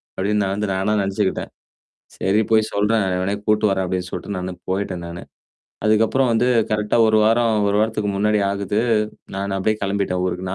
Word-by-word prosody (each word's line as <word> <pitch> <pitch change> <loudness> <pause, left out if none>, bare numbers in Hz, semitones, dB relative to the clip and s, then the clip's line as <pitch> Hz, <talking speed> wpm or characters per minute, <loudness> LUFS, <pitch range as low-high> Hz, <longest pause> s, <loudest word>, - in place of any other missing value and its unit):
அப்படின்னு 105 +2 0
நான் 95 0 -1
வந்து 105 0 -2
நானா 95 +3 0
நெனச்சுக்கிட்டேன். 95 0 -2 0.7
"சரி 100 +3 +2
போய் 110 -1 +3
சொல்றேன் 105 +1 +2
எவனயா 100 +2 -1
கூட்டு 105 0 +3
வரேன்" 95 -1 -1
அப்டின்னு 90 0 -3
சொல்லிட்டு 100 - -5
நானு 90 0 -4 0.2
போய்ட்டேன் 95 -2 -2
நானு. 85 0 -8 0.6
அதுக்கப்புறம் 115 +4 +3
வந்து 115 +2 +2 0.2
கரெக்ட்டா 105 +1 +1
1 110 0 +4
வாரம், 115 0 +3
1 100 - +1
வாரத்துக்கு 110 -1 0
முன்னாடி 105 +1 +2
ஆகுது. 100 +1 -1 0.6
நானு 100 0 -3
அப்டியியே 110 +3 0
கிளம்பிட்டேன் 100 -2 -1
ஊருக்கு. 90 0 -3
100 Hz, 165 wpm, -21 LUFS, 95-110 Hz, 0.7 s, 1